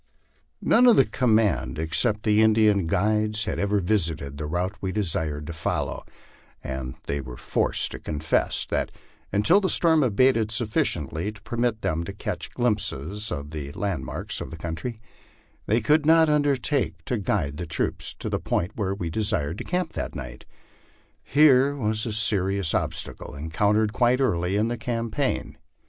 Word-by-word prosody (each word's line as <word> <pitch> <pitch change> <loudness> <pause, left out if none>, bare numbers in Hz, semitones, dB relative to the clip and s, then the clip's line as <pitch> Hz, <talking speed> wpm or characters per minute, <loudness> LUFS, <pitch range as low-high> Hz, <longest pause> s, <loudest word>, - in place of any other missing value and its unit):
None 245 +2 +5
of 240 - +7
the 135 - +5
command 110 -9 +1
except 105 +8 0
the 105 0 +3
Indian 110 -4 +4
guides 110 +4 +1
had - - -3
ever 100 0 +1
visited 80 -8 -1
the 75 - -3
route 90 +5 -2
we 95 - -2
desired 80 -7 -2
to 85 - -6
follow, 80 - -2 0.6
and 65 -1 -5
they 70 0 -3
were 60 -2 -9
forced - - 0
to - - -7
confess 75 0 -1
that - - -1 0.4
until 105 - +4
the 190 - 0
storm 160 -2 +4
abated 120 -2 +3
sufficient 105 - 0
ly 85 +6 -2
to 105 -2 -10
permit 120 0 -1
them 80 +2 0
to - - -6
catch - - -4
glimpses 105 - -1
of 70 +1 -5
the 75 -2 -5
landmarks 95 -10 -3
of - - -5
the 80 - -8
countiy, 85 +9 -5 0.7
they 110 +3 +3
could 150 +7 +3
not 160 +1 +5
undertake 145 -2 0
to 125 - -1
guide 80 -8 -1
the 85 0 -5
troops 80 - -2
to - - -6
the - - -1
point 90 - -1
where 100 -3 -1
we 85 -4 -4
desired 85 -5 -1
to - - -4
camp 180 -2 -2
that - - -4
night. 60 0 -8 0.8
Here 140 -1 +4
was 110 -3 -1
a 110 - -3
serious 100 -4 +1
obstacle - - -3
encountered 105 +8 +1
quite 125 +1 +3
early 90 -8 +1
in 105 +2 +2
the 120 +1 -2
campaign. 115 - -2
105 Hz, 165 wpm, -25 LUFS, 80-120 Hz, 0.8 s, of